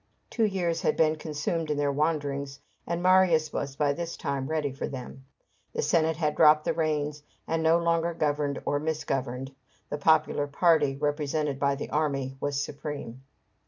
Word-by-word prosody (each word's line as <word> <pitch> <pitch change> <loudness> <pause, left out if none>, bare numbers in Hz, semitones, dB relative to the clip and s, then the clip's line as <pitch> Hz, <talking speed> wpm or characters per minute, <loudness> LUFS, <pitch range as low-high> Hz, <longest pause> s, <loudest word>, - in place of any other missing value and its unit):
Two 225 - +2
years 175 -5 -1
had - - +1
been 155 -1 +3
consumed 155 +1 -3
in 150 - 0
these 145 0 +1
wanderings, 140 -2 -1 0.3
and 170 +1 -2
Marius 180 -4 +4
was 140 -1 -3
by 145 0 +1
this 170 +2 -5
time 135 -1 -2
ready 155 -2 -1
for 135 - -4
them. 130 0 -8 0.5
The 465 - -1
Senate 160 - +2
had 155 -2 0
dropped 155 -1 +6
the - - +1
reins, 150 -2 -1 0.3
and 165 0 0
no 160 +1 +4
longer 170 0 +1
governed 145 -2 -1
or 145 - +1
misgoverned; 135 -4 -3 0.4
the 145 - -2
popular 155 -1 +3
party, 150 -2 +3
represented 145 0 -1
by 140 0 +2
the 140 - -6
army, 140 -3 -1
was 140 0 -1
supreme. 140 -4 -6
150 Hz, 165 wpm, -27 LUFS, 140-160 Hz, 0.5 s, dropped